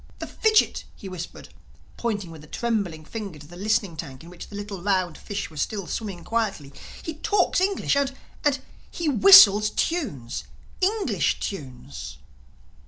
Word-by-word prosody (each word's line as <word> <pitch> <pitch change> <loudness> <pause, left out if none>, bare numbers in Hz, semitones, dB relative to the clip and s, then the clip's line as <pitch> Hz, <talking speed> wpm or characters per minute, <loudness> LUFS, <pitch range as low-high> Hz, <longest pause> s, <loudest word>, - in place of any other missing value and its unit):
"The - - -5
fidgit," 435 -1 +2
he 195 - -10
whispered, 180 -2 -8 0.5
pointing 205 -7 -3
with 160 -2 -11
a - - -13
trembling 195 -8 -2
finger 200 -4 -6
to 145 - -12
the 170 +4 -13
listening 200 -2 0
tank 135 -3 -8
in 170 - -12
which 180 - -10
the 205 - -10
little 205 -2 -6
round 185 -4 +1
fish 200 -5 -5
was 150 - -4
still 200 -4 -2
swimming 190 -1 -5
quietly, 200 -12 -2 0.3
"he 320 - -4
talks 405 0 +2
English! 385 -5 +1
And—and—and 275 0 -2 0.2
he 340 - -4
whistles 215 - +8
tunes—English 335 - -2
tunes!" 130 - -7
205 Hz, 145 wpm, -25 LUFS, 165-265 Hz, 0.5 s, whistles